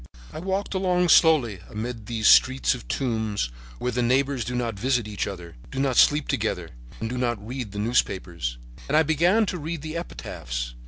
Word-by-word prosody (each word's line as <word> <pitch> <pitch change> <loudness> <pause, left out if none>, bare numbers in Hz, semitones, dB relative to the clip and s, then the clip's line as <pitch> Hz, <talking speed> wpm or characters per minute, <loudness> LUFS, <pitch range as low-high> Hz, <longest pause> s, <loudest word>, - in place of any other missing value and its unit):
"I - - -6
walked 190 +4 -2
along 180 -2 +1
slowly 140 - +5
amid 110 0 -5
these 110 -2 0
streets 130 0 +5
of 125 - -9
tombs, 110 - -1 0.3
where 125 - -2
the 125 +1 -1
neighbors 130 +1 +1
do 125 +2 -4
not 120 -2 -1
visit 125 -2 +1
each 105 -1 -3
other, 85 -7 -8
do 135 - -5
not 135 -2 +1
sleep 150 +4 +5
together - - -2 0.3
and 115 - -3
do 125 +2 -4
not 120 -4 -2
read 125 -4 -5
the 105 - -8
newspapers. 95 - -1 0.3
And 150 - +2
I 160 - +6
began 175 +8 +3
to 180 -2 -3
read 160 0 -5
the 155 0 -5
epitaphs. - - -5
125 Hz, 190 wpm, -25 LUFS, 105-155 Hz, 0.3 s, I